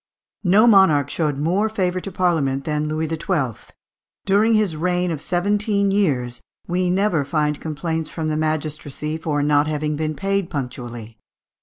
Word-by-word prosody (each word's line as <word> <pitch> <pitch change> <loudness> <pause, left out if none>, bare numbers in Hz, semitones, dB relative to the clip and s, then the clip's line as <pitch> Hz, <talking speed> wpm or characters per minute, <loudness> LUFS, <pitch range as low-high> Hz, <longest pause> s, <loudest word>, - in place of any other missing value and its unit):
No 200 +4 +5
monarch 175 - +5
showed 150 -4 -1
more 180 +9 +1
favour 185 -4 -1
to 195 - -7
Parliament 160 -7 0
than 150 0 -1
Louis 155 +1 -1
XII. 155 - -2 0.5
During 210 +3 +3
his 210 -6 +1
reign 180 +2 0
of 155 -3 -4
seventeen 200 +3 +1
years 130 -12 0 0.2
we 180 +1 0
never 185 -4 +1
find 150 +1 -1
complaints 160 +1 -3
from 160 -2 -4
the 155 - -1
magistracy 155 0 -2
for 150 -3 -1
not 145 0 +3
having 150 0 -1
been 155 0 -2
paid 195 0 -1
punctually. 120 -5 -6
160 Hz, 150 wpm, -21 LUFS, 150-185 Hz, 0.5 s, No